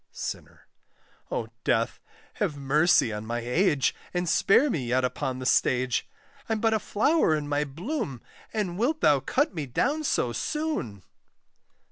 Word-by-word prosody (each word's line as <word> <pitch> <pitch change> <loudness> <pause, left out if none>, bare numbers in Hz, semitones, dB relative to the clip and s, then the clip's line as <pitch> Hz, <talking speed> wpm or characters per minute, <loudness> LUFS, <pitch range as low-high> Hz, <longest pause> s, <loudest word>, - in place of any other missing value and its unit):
SINNER. - - -7 0.6
O 110 - -3
Death! 115 -1 +1 0.4
have 145 - 0
mercy 140 -3 +3
on 105 0 -5
my 115 +2 -3
age, 140 +4 +2 0.2
And 175 0 0
spare 240 - +4
me 150 - -2
yet 130 +2 +2
upon 130 0 -2
the 130 - -6
stage: 125 -2 +2 0.4
I'm 220 -1 0
but 225 0 +2
a 220 - +2
flower 215 - +2
in 150 -1 -3
my 145 +1 0
bloom, 165 - -4 0.3
And 195 -4 -2
wilt 300 +7 +1
thou 145 -2 +5
cut 285 - 0
me 155 -5 -4
down 285 - 0
so 125 - 0
soon! 125 - -3
150 Hz, 150 wpm, -27 LUFS, -, 0.6 s, thou